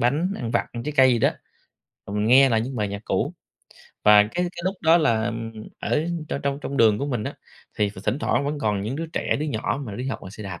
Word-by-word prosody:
bánh, 150 +10 +1
ăn 115 - -4
vặt, - - +1
ăn 120 -1 -5
trái 150 +3 -3
cây 130 -1 +6
gì 120 - +2
đó, - - +3 0.8
rồi 100 +1 -4
mình 105 +1 +1
nghe 135 +3 +7
lại 110 -2 +2
những 125 +2 -4
bài 105 -2 -1
nhạc 100 0 -5
cũ. - - -1 0.7
Và 105 0 +8
cái 105 - -5
cái 175 -1 -2
lúc 190 +1 0
đó 165 +1 +6
là 115 -5 +1 0.5
ở 150 +1 0 0.2
trong - - -3
trong 140 +1 -1
trong 140 - -4
đường 110 -3 +5
của 140 - -2
mình 120 -6 -2
á, - - -4 0.4
thì 105 -1 +2
th 100 - -13
thỉnh 135 - 0
thoảng 140 - 0
vẫn 145 0 -2
còn 105 -7 0
những 120 +7 -3
đứa 165 +1 -3
trẻ, 160 - -1
đứa 155 - -1
nhỏ 130 +2 -2
mà 100 - -6
đi 125 +2 -4
học - - -3
bằng 95 - -8
xe 105 - -9
đạp. 95 -4 -7
120 Hz, 265 wpm, -24 LUFS, 105-145 Hz, 0.8 s, Và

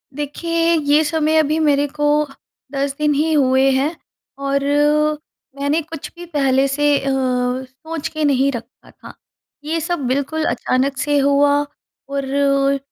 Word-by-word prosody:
देखिए 335 +3 0
ये 295 +1 +3
समय 315 +1 +1
अभी 310 +1 +1
मेरे 290 -2 +2
को 295 +1 -3 0.7
10 275 0 -2
दिन 300 -1 +1
ही 310 +3 +1
हुए 265 -1 +3
हैं। 280 +5 0 0.5
और 275 0 0 1.0
मैंने 290 +4 +1
कुछ 320 -1 -9
भी 350 0 -9
पहले 275 -4 +1
से 290 +1 +2
अ, 275 - -3
सोच 260 +4 -2
के 310 -1 -4
नहीं 275 0 +2
रखा 235 0 -10
था। - - -13 0.5
ये 325 +2 -2
सब 335 -5 -2
बिल्कुल 285 +4 -1
अचानक 270 +2 0
से 290 +2 +1
हुआ 285 +1 +3 0.6
और 275 -1 -2
ओ 275 0 +2
285 Hz, 145 wpm, -19 LUFS, 270-310 Hz, 1.0 s, ये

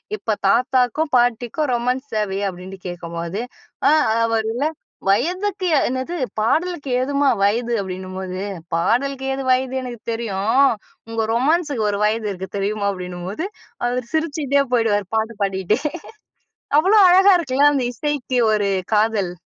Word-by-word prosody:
இப்ப 220 - -2
தாத்தாக்கும் 255 +6 +2
பாட்டிக்கும் 245 +4 +1
ரொமான்ஸ் 250 +3 -1
தேவையா?" 200 -1 -1
அப்பிடின்ட்டு 185 +1 -9
கேட்கும்போது, 170 +3 -5 0.5
அ, - - +5 0.3
அவருல 225 +4 0 0.4
வயதுக்கு 365 - 0 0.2
என்னது 260 +7 -3 0.2
பாடலுக்கு 310 +5 0
ஏதும்மா 280 +1 +1
வயது? 235 +4 +1
அப்பிடின்னும்போது, 185 -1 -5 0.4
"பாடலுக்கு 265 +9 0
ஏது 270 0 -3
வயது, 260 0 +1
எனக்கு 245 -3 -7
தெரியும். 225 +1 0 0.5
உங்க 225 0 -4
ரொமான்ஸுக்கு 285 -1 +1
ஒரு 200 - -1
வயது 215 0 0
இருக்கு 190 0 -6
தெரியுமா?" 200 +1 -1
அப்பிடின்னும்போது 180 - -5 0.4
அவரு 250 +1 -1
சிரிச்சுகிட்டே 290 -3 +1
போயிடுவாரு, 210 -4 +2
பாட்டு 220 +1 -1
பாடிட்டே. 195 +4 0 1.0
அவ்ளோ 390 +6 +4
அழகா 385 +2 +7
இருக்குல்ல, 290 -2 +3
அந்த 260 -3 0
இசைக்கு 275 -3 -1
ஒரு 205 -2 +1 0.3
காதல். 210 -4 +1
235 Hz, 120 wpm, -21 LUFS, 200-275 Hz, 1.0 s, அழகா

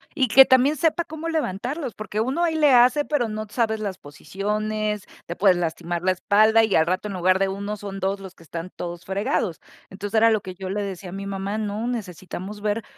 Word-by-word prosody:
Y 265 -4 +2
que 270 +4 +9
también 260 +4 +4
sepa 325 +3 +1
cómo 315 +1 -6
levantarlos, 270 - -2
porque 215 0 -5
uno 265 +9 0
ahí 330 -2 +1
le 300 -2 +4
hace, 250 +4 +5
pero 285 -7 0
no 215 0 -4
sabes 220 -1 0
las 200 -3 -4
posiciones, 210 +7 -3 0.2
te 170 - -6
puedes 190 -2 +4
lastimar 170 0 -2
la 185 +1 +2
espalda 215 +4 +4
y 220 -3 +1
al 160 - +4
rato 185 +4 -1
en 205 - -5
lugar 185 +1 +2
de 195 0 +1
1, 200 +2 -4
son 195 -1 -7
2 195 +1 -1
los 190 -2 -10
que 170 - -18
están 165 +2 -6
todos 175 0 -6
fregados. 200 - -1 0.3
Entonces, 205 +3 -3
era 225 +1 +6
lo 215 -2 +1
que 185 -1 -8
yo 185 0 -6
le 205 +2 -2
decía 190 -2 -6
a - - -9
mi 195 0 -5
mamá: 195 +1 -3
“No, 215 +1 -3
necesitamos 200 -2 -6
ver 215 +1 -1
205 Hz, 220 wpm, -23 LUFS, 190-230 Hz, 0.3 s, que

